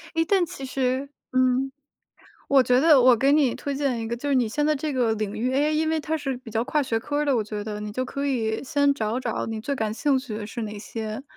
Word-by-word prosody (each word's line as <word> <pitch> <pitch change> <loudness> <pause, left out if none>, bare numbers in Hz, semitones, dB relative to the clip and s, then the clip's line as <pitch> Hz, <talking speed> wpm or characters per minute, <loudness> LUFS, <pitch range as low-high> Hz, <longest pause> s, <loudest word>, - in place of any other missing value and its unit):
诶， 325 - +3
但 370 0 +2
其 275 - -9
实 260 +1 -1 0.2
嗯， 255 +1 +2 0.8
我 275 -2 +5
觉 250 0 +3
得 300 -2 +6
我 250 -1 +6
给 275 +5 +3
你 285 -5 +3
推 285 -1 -4
荐 270 -4 0
一 225 - -4
个 235 - -2
就 285 +5 -5
是 280 - +2
你 245 -3 +3
现 295 +7 -1
在 305 -1 +2
这 300 +1 -3
个 240 -4 +1
领 210 -1 -3
域 245 +4 -1
，AI 285 +3 +2
因 315 +1 +1
为 320 0 +1
它 310 +1 -2
是 275 -4 -2
比 245 -2 -11
较 225 +1 0
跨 285 +3 0
学 225 -4 -1
科 290 +5 -4
儿 295 - +1
的 280 -2 +2
我 225 - +1
觉 210 0 -5
得， 210 -1 -5
你 210 0 -5
就 255 +4 -2
可 280 +2 -3
以 225 -4 -1
先 285 +1 +2
找 225 -2 -2
找 240 -3 -3
你 225 -1 -4
最 280 +3 -2
感 220 -4 -2
兴 275 +2 +2
趣 245 -5 -6
的 210 -1 -5
是 235 +2 -6
哪 210 -1 -5
些。 220 +2 -5
255 Hz, 295 characters per minute, -25 LUFS, 225-285 Hz, 0.8 s, 得